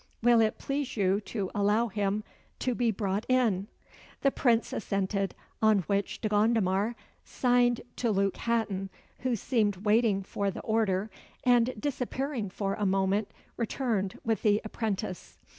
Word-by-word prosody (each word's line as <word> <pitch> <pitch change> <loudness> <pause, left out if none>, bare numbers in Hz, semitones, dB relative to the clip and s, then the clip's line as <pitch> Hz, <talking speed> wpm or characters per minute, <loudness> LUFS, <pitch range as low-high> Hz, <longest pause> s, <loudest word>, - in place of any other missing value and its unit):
"Will 240 -1 +6
it 215 -1 +1
please 275 -3 -3
you 195 0 +2
to 200 -5 -3
allow 210 +3 +2
him 205 0 -1 0.3
to 255 - -1
be 240 0 +1
brought 200 -1 -1
in?" 225 -7 +2 0.5
The 275 - +3
Prince 235 -4 +2
assented, 195 -1 -1 0.3
on 215 -2 +5
which 200 +3 -2
De - - 0
Gondomar 210 0 +2 0.3
signed 245 -1 +2 0.2
to 240 - 0
Luke 195 -2 +1
Hatton, 215 -5 -1 0.3
who 255 -2 0
seemed 215 -2 +1
waiting 210 -2 +3
for 200 +1 -2
the 190 - -6
order, 215 -2 0 0.3
and, 245 -1 +3
disappearing 265 -3 -2
for 195 +1 -2
a 210 - -3
moment, 195 +2 +1 0.3
returned 225 -5 -1
with 225 -1 0
the 210 -2 +3
apprentice. 215 -4 -4
215 Hz, 140 wpm, -29 LUFS, 195-235 Hz, 0.5 s, Will